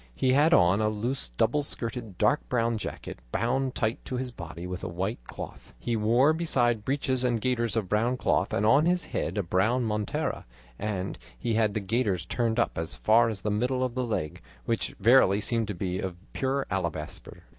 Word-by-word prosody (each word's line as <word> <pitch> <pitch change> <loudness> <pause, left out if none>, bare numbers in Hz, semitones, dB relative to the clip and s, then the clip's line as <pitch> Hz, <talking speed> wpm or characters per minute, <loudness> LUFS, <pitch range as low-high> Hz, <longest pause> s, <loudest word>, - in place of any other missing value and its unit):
He 130 - +2
had 150 +4 +5
on 90 - +5
a 105 - +2
loose 110 - -2
double 110 - +1
skirted 115 -7 -5
dark 145 - +2
brown 115 -2 +1
jacket - - -6
bound 130 +3 0
tight 110 +1 -1
to 130 - -4
his 125 0 -3
body 85 -4 -8
with 90 0 -5
a - - -2
white 90 - -3
cloth; - - -9
he 115 - -2
wore 120 +7 +4
besides 120 -9 +1
breeches 130 +1 0
and 120 -2 +1
gaiters 120 -1 0
of 110 -4 0
brown 115 +6 +1
cloth, - - +1
and 105 - +1
on 140 +9 +5
his 180 0 +1
head 90 - -2
a 100 - +1
brown 105 +9 +1
montera; 105 -2 -2 0.3
and 100 -3 -3 0.2
he 115 - -1
had 110 -2 +2
the - - +1
gaiters 100 -4 0
turned 115 +1 0
up 120 - +1
as 80 +1 -4
far 115 +2 +4
as 105 -3 -5
the 105 - -1
middle 125 +5 0
of 125 -2 -1
the 130 0 -1
leg, 105 -10 -3 0.2
which 115 -1 -1
verily 115 -5 +5
seemed 115 +1 0
to 100 - -4
be 90 0 -2
of 95 -2 -3 0.2
pure 135 +1 0
alabaster. 85 -5 -4
115 Hz, 200 wpm, -28 LUFS, 100-125 Hz, 0.3 s, had